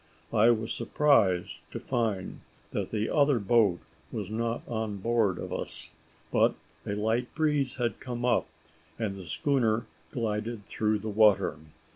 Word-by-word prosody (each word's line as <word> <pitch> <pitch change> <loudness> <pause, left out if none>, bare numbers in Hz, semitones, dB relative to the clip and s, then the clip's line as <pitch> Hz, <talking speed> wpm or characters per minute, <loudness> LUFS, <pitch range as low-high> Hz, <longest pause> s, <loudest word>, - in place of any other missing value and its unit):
I 110 +1 +6
was 115 -1 +1
surprised 115 -8 +2
to - - -5
find 115 -7 -2 0.3
that - - -2
the 110 0 -1
other 145 -3 +3
boat 100 -4 +3 0.3
was 105 -4 -4
not 115 +1 -2
on 110 -3 -2
board 110 -3 +1
of - - -5
us: - - -3 0.4
but - - +3 0.3
a 100 - -1
light 110 +4 -1
breeze 150 -4 +1
had 120 -4 -1
come 120 -1 -4
up, 125 - +2 0.5
and 105 -4 -2
the 95 -3 -9
schooner 115 - +1 0.3
glided 110 -2 -2
through 110 0 0
the 110 +1 -5
water. 100 -7 +4
110 Hz, 145 wpm, -29 LUFS, 105-120 Hz, 0.5 s, I